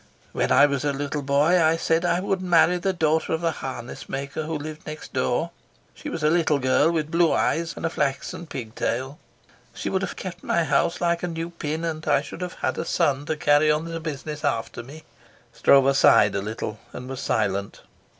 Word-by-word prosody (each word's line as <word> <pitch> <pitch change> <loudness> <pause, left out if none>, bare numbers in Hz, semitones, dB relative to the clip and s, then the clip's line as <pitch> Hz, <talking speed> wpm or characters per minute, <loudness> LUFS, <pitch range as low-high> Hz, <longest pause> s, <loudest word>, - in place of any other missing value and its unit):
When - - -1
I 145 - +7
was 140 -2 -1
a 145 -1 0
little 145 +1 -3
boy 145 +6 +3
I 160 0 +3
said 165 +1 +1
I 175 +1 +1
would 190 -1 -1
marry 175 0 +4
the 190 +2 0
daughter 160 -3 +1
of 160 - -1
the 165 -1 +1
harness 130 -5 -7
maker 140 +3 -4
who 160 0 -3
lived 155 +1 -8
next 155 0 -8
door. 130 +6 0 0.4
She - - -8
was 165 - -5
a 150 - +4
little 165 -3 +2
girl 130 +4 +3
with 160 -2 -1
blue 170 -1 +3
eyes 165 +1 0
and - - -4
a - - +1
flaxen 140 +5 -2
pigtail. 130 +2 -4 0.6
She - - -4
would 190 - 0
have - - -4
kept 180 -1 -7
my 170 - +1
house 160 +3 +1
like 170 -1 +1
a 180 - -2
new 165 0 -4
pin, 160 0 -4
and 160 -1 -3
I 145 -2 +3
should 155 - -9
have 180 0 -4
had - - -1
a - - -1
son 145 -4 0
to 155 - -1
carry 145 +1 +4
on 150 +1 +1
the 165 0 -5
business 150 -1 -6
after 115 -7 -2
me." 145 +6 -12 0.5
Stroeve 135 0 +4
sighed 105 -6 +5
a 100 - -1
little 110 0 -5
and 125 - -7
was 130 -1 -6
silent. 100 -2 -1
155 Hz, 210 wpm, -24 LUFS, 140-165 Hz, 0.6 s, I